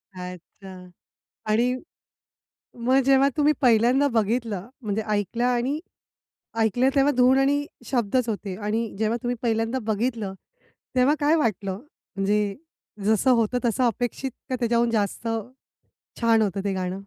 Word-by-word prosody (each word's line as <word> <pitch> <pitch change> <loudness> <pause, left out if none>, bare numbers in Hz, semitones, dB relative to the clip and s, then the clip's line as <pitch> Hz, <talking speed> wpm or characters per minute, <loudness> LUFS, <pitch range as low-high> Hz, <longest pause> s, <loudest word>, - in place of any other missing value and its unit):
अच्छा. 180 +1 -10 0.6
आणि 235 +4 +2 1.1
मग 260 +2 +4
जेव्हा 275 +1 +5
तुम्ही 300 +1 +4
पहिल्यांदा 245 +3 +4
बघितलं 225 -2 0
म्हणजे 215 0 -2
ऐकलं 210 +3 -1
आणि 250 +4 +1 0.8
ऐकलं 225 +4 +2
तेव्हा 280 +1 +4
धून 255 +1 +5
आणि 285 +2 +2 0.2
शब्दच 240 0 0
होते 200 -3 -3
आणि 220 +2 -2
जेव्हा 220 +1 +1
तुम्ही 245 0 -1
पहिल्यांदा 225 +2 0
बघितलं 215 -3 -2 0.6
तेव्हा 255 +4 +4
काय 295 +2 +4
वाटलं, 205 - -1 0.4
म्हणजे 200 +1 0 0.5
जसं 220 +4 +3
होतं 235 0 +2
तसं 240 +2 +1
अपेक्षित 245 +3 -2 0.2
का 255 - 0
त्याच्याहून 235 0 +2
जास्त 215 +1 -1 0.9
छान 230 -1 +4
होतं 195 -2 -1
ते 195 - 0
गाणं? 185 -1 -2
230 Hz, 125 wpm, -24 LUFS, 205-255 Hz, 1.1 s, जेव्हा